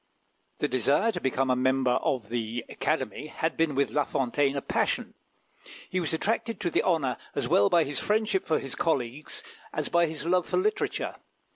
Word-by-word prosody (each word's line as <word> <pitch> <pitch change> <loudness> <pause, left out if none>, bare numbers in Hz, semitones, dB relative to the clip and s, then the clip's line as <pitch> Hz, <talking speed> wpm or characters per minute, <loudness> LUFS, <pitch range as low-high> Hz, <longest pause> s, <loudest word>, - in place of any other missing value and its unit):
The - - 0
desire 145 - +2
to 180 -5 -5
become 130 0 +1
a - - +3
member 130 0 +2
of 125 -3 0
the 115 0 -3
Academy 150 - -2
had 160 +1 -2
been 160 -3 +1
with 140 +1 +1
La 145 - +2
Fontaine 135 +1 0
a 140 - -1
passion. - - 0 0.8
He 185 - +1
was 170 - -1
attracted 225 +5 0
to 175 - 0
the - - +3
honour 150 -8 +1 0.2
as - - 0
well 100 - +4
by 170 -2 +5
his 145 -1 -2
friendship 210 -2 +1
for 160 - +1
his 135 - -4
comrades 150 - -2 0.3
as - - -2
by 170 -1 +3
his 155 -1 -3
love 180 +1 +2
for - - 0
literature. 425 +3 -1
145 Hz, 185 wpm, -28 LUFS, 130-175 Hz, 0.8 s, by